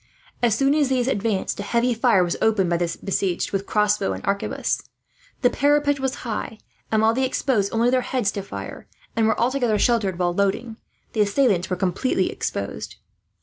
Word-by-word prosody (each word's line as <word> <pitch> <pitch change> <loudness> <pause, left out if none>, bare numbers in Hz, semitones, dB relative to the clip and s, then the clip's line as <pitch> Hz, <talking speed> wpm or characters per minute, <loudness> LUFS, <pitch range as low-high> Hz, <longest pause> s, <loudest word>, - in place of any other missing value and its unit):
As 235 -3 +3
soon 275 +1 +3
as 295 -3 +2
these 255 -2 +1
advanced, 215 -6 -1
a - - -1
heavy 235 +4 +1
fire 230 -5 +3
was 175 - -1
opened 200 -5 +2
by 170 - +2
the 170 -1 -2
besieged 195 -2 -1
with 195 0 -2
crossbow 210 - +1
and 95 - -7
arquebus. 200 0 -1 0.6
The 245 - +5
parapet 285 0 +2
was 265 -1 -1
high 225 -1 -4 0.3
and, 220 0 +2
while 225 +1 +4
they 260 +3 0
exposed 255 -5 0
only 230 +2 +2
their 255 0 +3
heads 245 -5 0
to 200 - -4
fire, 195 - -8 0.3
and 225 -1 +2
were 220 - +1
altogether 245 -3 +1
sheltered 210 -6 +1
while 175 -1 0
loading, 200 +4 -1 0.4
the 220 - +1
assailants 200 -4 +2
were 185 - 0
completely 185 +8 0
exposed. - - -4
220 Hz, 185 wpm, -23 LUFS, 195-250 Hz, 0.6 s, The